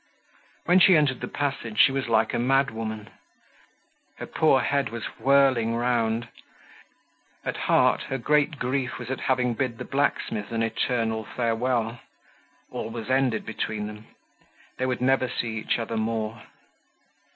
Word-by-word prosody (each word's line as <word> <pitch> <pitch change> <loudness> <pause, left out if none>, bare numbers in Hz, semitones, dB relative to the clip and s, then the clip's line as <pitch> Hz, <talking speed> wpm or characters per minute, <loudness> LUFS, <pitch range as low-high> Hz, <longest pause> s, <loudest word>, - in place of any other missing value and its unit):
When 180 +2 +5
she 185 -1 +7
entered 145 -4 +1
the - - -3
passage 135 -6 -3
she 135 - +6
was 135 -1 -2
like 110 -1 +2
a - - 0
mad 135 +3 +2
woman. 110 -1 -6 1.1
Her - - -6
poor 145 -4 +3
head 140 -4 0
was 115 0 -6 0.2
whirling 135 -4 +3
round. 115 -1 0 1.2
At - - -2
heart - - +3
her 135 - -1
great 150 +4 +1
grief 130 0 -2
was - - -6
at 130 - -3
having 125 -2 +1
bid 120 0 -2
the - - -6
blacksmith 135 -6 -1
an 115 0 0
eternal 115 0 -1
farewell. 115 +1 -1 0.7
All - - -4
was 115 +1 -5
ended 130 -4 +1
between 110 -1 -3
them; 105 +1 -9 0.7
they 130 - -1
would 125 -1 -2
never 130 0 +2
see 115 -2 -3
each - - -1
other 115 -1 -3
more. 110 0 -2
120 Hz, 150 wpm, -25 LUFS, 115-135 Hz, 1.2 s, she